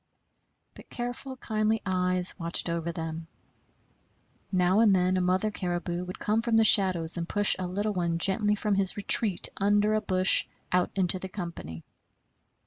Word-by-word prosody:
But - - -16
careful, 245 +2 -6
kindly 220 -2 -1
eyes 180 -1 0
watched 170 +1 0
over 170 0 -3
them. 165 0 -7 1.2
Now 185 +1 +2
and 215 -4 +4
then 185 0 +1
a 185 - 0
mother 185 +4 0
caribou 175 -2 -4
would 180 - -8
come 215 +2 -1
from 230 -1 0
the 225 - +4
shadows 180 -6 +4
and 170 0 -5
push 205 -1 +3
a 185 - -3
little 205 +4 -3
one 170 -3 -2
gently 205 +4 +1
from 210 0 -2
his 195 0 0
retreat 205 -1 +2
under 205 +1 +1
a 215 - 0
bush 185 -2 +3 0.3
out 180 -1 +1
into 185 -1 +2
the 190 - -8
company. 170 - -8
185 Hz, 160 wpm, -27 LUFS, 175-210 Hz, 1.2 s, and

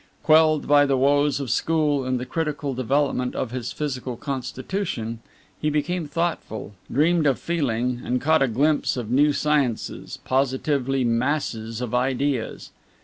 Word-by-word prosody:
Quelled 155 -1 +4
by 145 0 +6
the 135 -1 +2
woes 145 +2 +3
of 135 -4 -3
school 150 -4 +1
and 130 -1 0
the 125 - -4
critical 150 -2 -2
development 130 0 0
of 120 - -2
his 125 -1 -4
physical 130 -5 -4
constitution, 130 - -4 0.4
he 150 - +1
became 155 +3 -1
thoughtful, 145 -10 -3 0.2
dreamed 155 +3 +3
of 135 - +2
feeling, 125 -7 -1
and 125 +1 0
caught 160 +2 +3
a 135 - +4
glimpse 140 +5 +1
of 120 -2 -4
new 145 +4 +4
sciences 145 -5 -1
positively 135 0 0
masses 115 -2 -1
of 125 -2 -4
ideas. 130 0 -1
135 Hz, 145 wpm, -24 LUFS, 125-150 Hz, 0.4 s, by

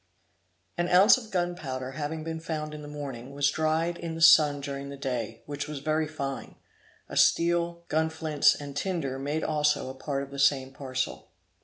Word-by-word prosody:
An 175 0 +1
ounce 190 +5 +7
of 225 -3 -12
gunpowder 175 -9 -3
having 155 +2 -4
been 160 0 -4
found 155 -2 -4
in 150 - -7
the 145 - -9
morning, 140 -3 -7
was 140 0 +2
dried 160 +3 0
in 165 -1 -5
the - - -6
sun 150 -3 +7
during 140 0 -5
the 140 - -8
day, 115 -4 -4
which 145 0 -5
was 150 -1 -5
very 155 +2 0
fine; 140 -3 -5 0.5
a - - -8
steel, 170 0 +2
gunflints, 160 -1 +2
and 140 -1 -8
tinder 145 -5 -2
made 145 +3 -2
also 150 -3 +1
a - - -9
part 140 +1 -3
of 140 - -10
the 140 - -7
same 135 -1 +3
parcel. 130 -1 -4
150 Hz, 180 wpm, -28 LUFS, 140-160 Hz, 0.5 s, ounce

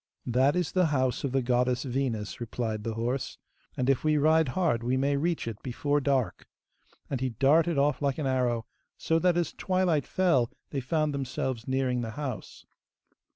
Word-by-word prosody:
'That 130 +5 +3
is 180 -4 0
the 185 -2 +3
house 130 -4 0
of 140 - -1
the 135 0 +1
goddess 125 0 +1
Venus,' 120 -7 -2
replied 110 -2 -3
the 115 -1 -3
horse, 125 +3 -2 0.4
'and 125 - 0
if 135 -2 +2
we 155 -1 +3
ride 160 +1 +4
hard 160 -11 +2
we 125 +2 0
may 140 +2 +1
reach 165 -1 -1
it 110 -2 -5
before 145 +3 -1
dark'; 135 -4 0 0.6
and 130 -3 -3
he 130 - 0
darted 145 +7 +3
off 140 0 +2
like 140 -2 0
an 155 - -2
arrow, 125 -3 0 0.3
so 165 0 +1
that 175 0 +2
as 170 -3 0
twilight 185 -6 0
fell 145 -11 +2 0.2
they 140 - -1
found 150 +3 0
themselves 130 -3 -3
nearing 130 -2 0
the 115 - -4
house. 135 -7 -6
135 Hz, 180 wpm, -28 LUFS, 125-150 Hz, 0.6 s, ride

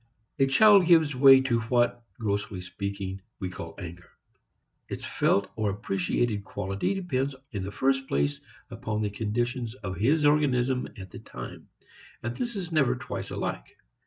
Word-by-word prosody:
A 135 - +5
child 200 +6 +6
gives 160 -4 +5
way 135 0 +8
to 125 -3 +1
what, 120 +1 +1 0.2
grossly 100 -4 -2
speaking, 95 +1 -5 0.2
we 95 -3 -4
call - - -8
anger. 90 -2 -9 0.8
Its - - -5
felt 100 0 +1
or 110 -2 0
appreciated 100 +1 -1
quality 100 - -2
depends 140 -7 -1 0.2
in 100 -5 -3
the 100 - -5
first 135 +3 +1
place 70 +1 0 0.3
upon 110 0 -3
the 105 - -1
condition 120 +4 -1 0.2
of 95 -3 -4
his 145 - +3
organism 130 -4 +2
at 95 -3 -9
the - - -9
time, - - -9 0.5
and 120 +1 -3
this 240 -2 -3
is 180 -4 -4
never 140 -6 +3
twice 125 - -6
alike. - - -4
120 Hz, 155 wpm, -27 LUFS, 100-135 Hz, 0.8 s, way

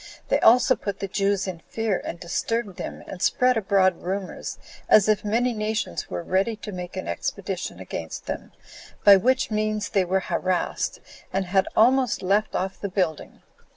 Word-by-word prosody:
They - - +3
also 250 +2 +6
put 200 -2 -5
the 195 - -3
Jews 195 0 0
in 180 -3 -5
fear, 220 +2 -2
and 170 - -6
disturbed 205 +3 -2
them, - - -6
and 180 - -8
spread 250 0 +3
abroad 190 -4 +2
rumors, 190 +1 -4 0.3
as 210 -1 +6
if 215 -1 +2
many 235 +4 +1
nations 215 - -2
were 90 -1 -4
ready 195 +5 +1
to 210 - -8
make 180 -2 -7
an - - -4
expedition 85 - -4
against 80 -1 -6
them, - - -5 0.5
by 200 - +9
which 255 +5 +1
means 215 0 -1
they 195 - +2
were 190 +2 0
harassed, 185 -1 -1 0.3
and 190 0 0
had 190 +1 +2
almost 250 0 +3
left 200 +3 +1
off 190 +1 -3
the 200 - -2
building. 180 -5 -2
200 Hz, 170 wpm, -25 LUFS, 185-220 Hz, 0.5 s, by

